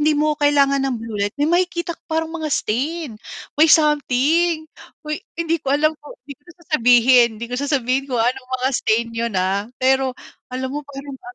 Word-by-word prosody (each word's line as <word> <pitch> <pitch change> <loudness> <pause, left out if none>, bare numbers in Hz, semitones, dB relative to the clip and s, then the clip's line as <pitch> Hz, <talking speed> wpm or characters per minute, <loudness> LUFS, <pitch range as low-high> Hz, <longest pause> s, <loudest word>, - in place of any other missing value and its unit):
hindi 305 +1 +3
mo 300 0 +1
kailangan 280 -1 +3
ng 255 - -2
blue 225 -2 -6
light, 205 0 -1
may - - +4
makikita 345 -1 0
ko - - -43
parang 320 0 -1
mga 315 -2 -4
stain, 275 +3 -2 0.4
may 315 - +8
something. 310 +2 +3 0.4
Uy 305 +3 -4 0.2
hindi 335 0 0
ko 270 - -6
alam 310 +2 +2
kung 295 - -12
hindi 280 - -8
ko 290 - -41
na 345 - -14
sasabihin, 245 -3 +5
hindi 235 - -5
ko 250 - -3
sasabihin 270 -2 0
kung 245 -3 0
anong 255 +1 -2
mga 260 - +2
stain 230 0 +1
yun, 230 -2 -3
ah, 195 +2 0
pero 265 0 +2 0.4
alam 260 +1 -3
mo 295 - -3
merong 275 -1 -9
ah 370 0 -11
275 Hz, 195 wpm, -20 LUFS, 250-310 Hz, 0.4 s, may